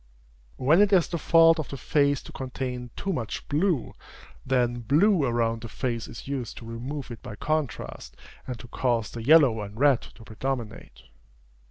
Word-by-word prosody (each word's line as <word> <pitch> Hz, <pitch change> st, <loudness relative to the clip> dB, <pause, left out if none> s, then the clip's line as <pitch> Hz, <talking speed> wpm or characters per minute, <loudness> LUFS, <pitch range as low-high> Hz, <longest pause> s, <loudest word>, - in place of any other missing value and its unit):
When 155 Hz, +9 st, +4 dB
it 205 Hz, -1 st, +4 dB
is 185 Hz, -4 st, +4 dB
the 170 Hz, -, -3 dB
fault 165 Hz, +1 st, +5 dB
of 155 Hz, -, -5 dB
a 140 Hz, -, -5 dB
face 140 Hz, +1 st, +1 dB
to -, -, -11 dB
contain 125 Hz, -1 st, -5 dB
too 195 Hz, -, -2 dB
much 120 Hz, -8 st, -4 dB
blue, 155 Hz, -, 0 dB, 0.5 s
then 120 Hz, -2 st, +1 dB
blue 155 Hz, -, +3 dB
around 115 Hz, -2 st, 0 dB
the 115 Hz, -, -6 dB
face 120 Hz, -1 st, -3 dB
is 115 Hz, -, -10 dB
used 135 Hz, -4 st, -4 dB
to 115 Hz, -, -9 dB
remove 125 Hz, +5 st, -6 dB
it 115 Hz, -, -9 dB
by 105 Hz, -, -8 dB
contrast, 155 Hz, +1 st, -3 dB, 0.3 s
and 125 Hz, -2 st, -4 dB
to 120 Hz, -, -11 dB
cause 120 Hz, -3 st, -1 dB
the 115 Hz, -, -6 dB
yellow 135 Hz, -5 st, +5 dB
and 105 Hz, +2 st, -8 dB
red 140 Hz, -3 st, +4 dB
to 115 Hz, -, -14 dB
predominate. 115 Hz, 0 st, -5 dB
130 Hz, 175 wpm, -26 LUFS, 115-150 Hz, 0.5 s, fault